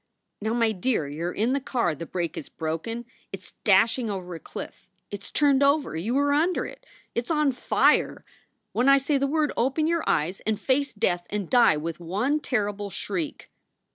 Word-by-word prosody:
Now, 220 +2 -1
my 230 -2 +3
dear, 210 - 0
you 160 +5 -3
re - - -8
in 230 +5 +2
the 280 - +1
car, 240 - 0
the 160 +2 -7
brake 170 -3 -3
is 150 - -7
broken! 165 +10 -4 0.3
It 195 - -6
s - - -15
dashing 225 +4 +3
over 185 -3 -5
a 165 - -6
cliff! - - -9 0.2
It 205 - -5
s - - -10
turned 285 -2 +3
over! 280 - +2
You 215 +11 -1
are 285 0 +3
under 335 +5 +1
it! - - -11 0.3
It 235 - -1
s - - -18
on 300 -3 +2
fire! 250 - +2 0.5
When 250 +3 +2
I 275 - +8
say 275 +1 +1
the 275 - +1
word 305 +1 +1
open 270 +6 +1
your 335 0 +1
eyes 170 +6 0
and 215 -1 -2
face 270 +3 +1
death 175 -5 0
and 205 -4 -3
die 240 -11 +5
with 165 +2 -4
one 210 - 0
terrible 205 -7 -2
shriek!" 185 -5 -5
225 Hz, 200 wpm, -26 LUFS, 180-275 Hz, 0.5 s, I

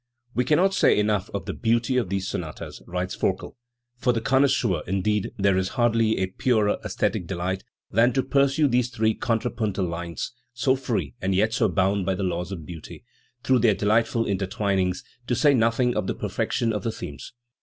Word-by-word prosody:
"We 125 - +1
cannot 180 +8 +3
say - - +4
enough 105 -2 +1
of - - -5
the - - -3
beauty 115 +3 +1
of 115 -8 0
these 95 0 -2
sonatas", 80 -5 -6
writes 90 +1 -3
ForkeL 95 0 -2 0.4
For 125 - +2
the 115 - 0
connoisseur, 130 - +2
indeed, 100 +2 0
there 95 -1 +3
is 95 0 -1
hardly 115 -2 +3
a 95 - +1
purer 105 +2 +1
aesthetic 90 - -1
delight 95 +1 -3 0.3
than 115 +4 +4
to 130 - +1
pursue 140 +3 +3
these 125 -1 +1
three 110 -2 +1
contra 115 +1 -1
puntal 105 -5 -1
lines 85 -1 -4 0.2
so 130 +2 +2
free 115 - -2
and 95 0 0
yet 110 +4 +2
so 115 -3 +2
bound 95 +2 +1
by 95 - +1
the 95 - -3
laws 90 0 -2
of 85 -5 -6
beauty 80 -2 -10 0.4
through 130 -1 +3
their 110 -3 +4
delightful 115 +3 +2
intertwinings, 95 -2 -1 0.2
to 120 - +1
say 140 +5 +4
nothing 120 0 +2
of - - -1
the - - -1
perfection 115 -2 -1
of 105 - -2
the 115 - -2
themes. 70 -9 -8
105 Hz, 185 wpm, -25 LUFS, 95-120 Hz, 0.4 s, say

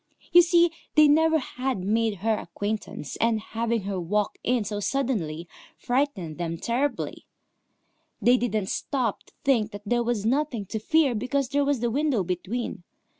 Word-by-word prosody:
You 350 - +9
see, 345 0 +4 0.2
they 305 -1 +7
never 320 +2 +4
had 260 -3 -3
made 220 +2 +1
her 225 - +4
acquaintance, 205 -7 -4
and 230 -1 +2
having 230 0 -2
her 195 -1 -3
walk 205 +4 -1
in 245 -2 +1
so 205 0 -3
suddenly 200 - -1 0.3
frightened 245 - -1
them 165 -1 -2
terribly. 255 - -2 0.9
They 245 +1 +5
didn't 215 -5 -1
stop 250 -7 -1
to - - -23
think 235 -7 +2
that 205 0 -8
there 240 +3 +1
was 235 -3 -1
nothing 255 -3 0
to 220 - -2
fear 300 +3 +3
because 255 +4 -1
there 285 +1 +2
was 280 -4 0
the 240 -1 0
window 275 -5 +1
between. 185 +5 -3
235 Hz, 160 wpm, -26 LUFS, 205-275 Hz, 0.9 s, You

